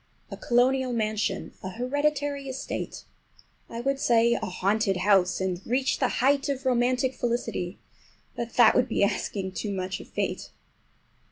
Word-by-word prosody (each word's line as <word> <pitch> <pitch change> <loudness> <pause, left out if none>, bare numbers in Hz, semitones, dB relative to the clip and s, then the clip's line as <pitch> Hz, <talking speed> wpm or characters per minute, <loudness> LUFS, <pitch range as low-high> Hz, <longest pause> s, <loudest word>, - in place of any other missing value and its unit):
A - - -4
colonial 255 +1 +2
mansion, 215 -3 -1
a 190 - -5
hereditary 280 +4 -1
estate, 260 0 -5 0.7
I 230 - -5
would 275 +2 0
say 235 -2 +4
a - - -1
haunted 195 +2 0
house, 185 -1 +3
and 185 -1 -2
reach 260 +2 0
the 260 - +3
height 275 +4 +1
of 270 -1 -3
romantic 255 +1 +2
felicity—but 235 0 -5
that 240 -2 +7
would 250 - +3
be - - +1
asking 195 -1 -1
too 205 +2 -4
much 190 -1 -3
of - - -11
fate! - - -3
240 Hz, 145 wpm, -27 LUFS, 200-260 Hz, 0.7 s, that